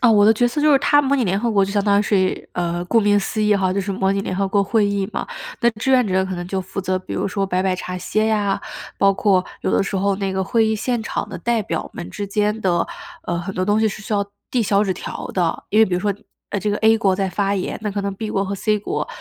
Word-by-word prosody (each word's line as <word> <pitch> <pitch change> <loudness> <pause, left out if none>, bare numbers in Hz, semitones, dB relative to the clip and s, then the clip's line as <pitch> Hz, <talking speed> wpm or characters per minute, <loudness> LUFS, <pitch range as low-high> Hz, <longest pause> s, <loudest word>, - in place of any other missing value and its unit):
啊， 245 - +5
我 205 -2 +5
的 220 - +7
角 240 +2 +2
色 270 +5 -2
就 300 0 +5
是 275 - +6
它 290 +1 +4
模 275 0 +1
拟 260 -4 +1
联 190 +1 +1
合 235 +2 0
国 200 -3 +3
就 195 - -5
相 205 -1 +1
当 200 -1 +4
于 205 - +3
是 190 -3 0
呃， 175 0 -2
顾 230 - +3
名 205 -1 +3
思 215 +2 -2
义 210 0 +4
哈， 190 -2 +1
就 200 - 0
是 195 +1 -3
模 190 0 +1
拟 195 - 0
联 185 - -3
合 195 0 0
国 200 +1 +2
会 215 +1 +2
议 200 -1 -1
嘛。 - - -3 0.3
那 235 - +4
志 225 +4 -2
愿 250 -3 +4
者 190 0 +1
可 190 -1 -4
能 175 0 -5
就 190 0 -1
负 190 +1 -5
责， 185 0 -1
比 185 - -9
如 - - -1
说， 195 +1 -1
摆 185 0 0
摆 190 -1 +1
茶 180 0 -5
歇 215 +4 0
呀， 205 -3 +1 0.4
包 195 0 +4
括 190 -2 +2 0.2
有 - - 0
的 - - +3
时 200 - -4
候 195 +1 +1
那 195 -1 -2
个 190 0 0
会 225 +4 +2
议 220 - +1
现 235 +1 -1
场 - - -3
的 - - -6
代 235 -2 0
表 165 -4 -3
们 175 - -7
之 205 - -5
间 210 +2 0
的， 180 -4 +1 0.4
呃， 170 - -2
很 190 +3 -5
多 185 - 0
东 205 +2 +2
西 220 - +3
是 215 +1 -7
需 210 - -5
要 200 -1 +2 0.3
递 245 -3 +1
小 200 0 +2
纸 195 -3 0
条 185 - -6
的。 175 -3 -1
因 210 - +2
为 220 - +8
比 185 - -2
如 180 - 0
说， 205 +1 +1 0.4
呃， 205 - -1
这 210 +1 -1
个 205 - 0
a 220 0 +5
国 195 -4 +2
在 195 0 -1
发 200 +2 0
言， 190 - -3
那 210 - -1
可 200 - -2
能 200 0 -2
b 215 +2 -5
国 195 - 0
和 200 0 -3
c 210 +2 0
国， 205 - -3
200 Hz, 325 characters per minute, -21 LUFS, 190-215 Hz, 0.4 s, 为